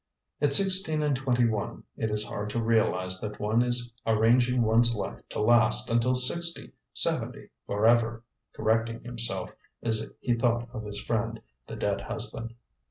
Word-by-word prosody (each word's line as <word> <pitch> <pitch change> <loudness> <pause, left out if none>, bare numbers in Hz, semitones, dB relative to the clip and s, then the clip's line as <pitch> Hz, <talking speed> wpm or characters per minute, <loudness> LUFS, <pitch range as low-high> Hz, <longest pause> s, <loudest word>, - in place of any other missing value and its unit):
"At 145 -1 +2
sixteen 185 -3 +5
and 145 -2 +1
twenty 125 -2 +1
one 110 -3 -3
it 110 - -2
is 105 0 -2
hard 105 -2 -5
to 115 - -2
realize 95 -5 0
that 105 -1 -6
one 110 +3 +1
is 120 -1 -2
arranging 120 +3 +2
one's 115 +1 +3
life 105 - -5
to - - -5
last 120 +1 +3
until 120 +2 +2
sixty, 170 +7 0 0.2
seventy, - - +1 0.2
forever," 115 +2 +2 0.3
correcting 115 +1 -1
himself 120 -1 -3 0.3
as 110 -1 -1 0.2
he 120 - 0
thought 120 0 0
of 110 -3 -6
his 100 0 -6
friend, 115 -1 -2 0.3
the - - -7
dead - - -2
husband. 115 0 -4
115 Hz, 155 wpm, -27 LUFS, 110-125 Hz, 0.3 s, sixteen